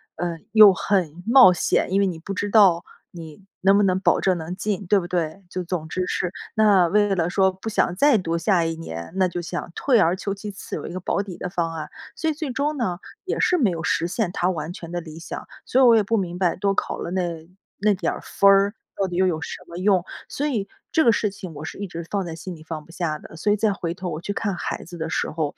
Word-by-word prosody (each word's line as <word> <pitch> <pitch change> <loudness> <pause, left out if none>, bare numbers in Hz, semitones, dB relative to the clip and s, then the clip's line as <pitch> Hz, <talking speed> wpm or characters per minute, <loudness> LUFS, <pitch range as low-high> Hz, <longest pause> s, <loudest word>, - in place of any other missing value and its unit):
呃， 170 0 -3 0.2
又 215 -3 +9
很 175 -4 -1
冒 245 -5 +8
险， 175 0 +1
因 195 - +3
为 200 - +3
你 175 -3 -3
不 175 +5 -6
知 205 +1 -2
道 190 -5 +5 0.3
你 165 +1 -11 0.2
能 195 +1 +5
不 205 - +4
能 185 -1 +2
保 180 -3 +3
证 185 -2 +2
能 165 +2 -5
进， 200 0 -2
对 205 - +4
不 175 - -6
对？ 175 +1 -2
就 185 - -3
总 170 -2 -4
之 185 +2 -2
是 180 - -1 0.2
那 205 -5 +5
为 205 +1 +2
了 170 -2 0
说 190 +1 +3
不 190 +4 -10
想 190 -4 +1
再 285 +5 +5
读 170 -3 -1
下 175 0 +2
一 165 0 -1
年， 85 - -7
那 190 -1 +3
就 175 0 -4
想 175 +1 -5
退 250 -5 +3
而 170 -1 +3
求 200 +1 -3
其 205 +1 -7
次 195 - -7
有 - - -7
一 - - -7
个 185 - -4
保 195 - 0
底 185 -4 -8
的 180 - -4
方 170 -2 -2
案。 155 -2 -6 0.3
所 320 - -1
以 - - 0
最 305 -2 -5
终 290 +4 -1
呢 185 -8 -2 0.3
也 - - -2
是 360 - +3
没 235 - +3
有 165 -1 -4
实 170 - +1
现 185 0 -1
她 180 -1 0
完 160 -2 -3
全 170 -5 -9
的 175 0 -3
理 160 -1 -10
想， 165 - -7 0.2
所 260 - +2
以 - - +7
我 235 -2 +7
也 215 - +3
不 225 +3 0
明 180 -3 -2
白 180 -3 +2
多 195 +1 0
考 - - -2
了 - - -4
那 170 -3 -3 0.3
那 210 +1 +3
点 190 - -1
儿 - - -7
分 200 - +3
儿 195 +1 +4 0.2
到 195 - 0
底 175 - -5
又 190 - +4
有 165 -3 0
什 - - -6
么 170 - -10
用？ 185 -1 +3 0.3
所 290 - -2
以 220 -9 -1 0.3
这 320 - +4
个 235 - +6
事 215 - +1
情 190 -3 -9
我 145 +2 -7
是 - - -7
一 200 - -4
直 170 -1 -7
放 200 -2 -1
在 165 - -5
心 180 +3 -7
里 155 - -14
放 160 -1 -6
不 - - -16
下 165 -3 -2
的。 155 - -13
所 205 +6 +1
以 - - +4
再 210 -1 +2
回 170 -3 -3
头 180 0 -5
我 155 -1 -5
去 200 - -4
看 200 -2 -2
孩 - - -4
子 175 0 -10
的 160 0 -3
时 - - -1
候， 155 -2 -2
185 Hz, 290 characters per minute, -23 LUFS, 170-205 Hz, 0.3 s, 又